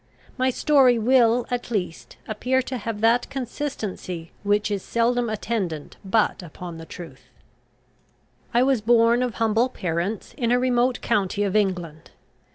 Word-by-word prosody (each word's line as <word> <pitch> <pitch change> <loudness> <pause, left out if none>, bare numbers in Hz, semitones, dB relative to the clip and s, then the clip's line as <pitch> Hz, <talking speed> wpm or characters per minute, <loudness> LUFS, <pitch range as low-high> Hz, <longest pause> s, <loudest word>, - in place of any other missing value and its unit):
My 260 0 +1
story 260 -2 +4
will, 240 0 +3
at 245 0 -3
least, 185 -7 -4
appear 250 +5 0
to 255 -1 -4
have 215 0 -4
that 230 +2 +3
consistency 220 - -5
which 205 +1 +1
is 200 -2 -1
seldom 235 +2 0
attendant 200 -8 -3
but 210 +1 +1
upon 170 -1 -9
truth. 175 -2 -11 1.2
I 240 +1 +4
was 265 -4 +2
born 230 +1 +4
of 250 -3 -1
humble 225 +2 +2
parents, 180 0 -3
in 235 -2 +1
a 245 - +4
remote 250 0 +1
county 205 0 0
of 200 0 -1
England. 180 -7 -1
225 Hz, 140 wpm, -24 LUFS, 195-245 Hz, 1.2 s, story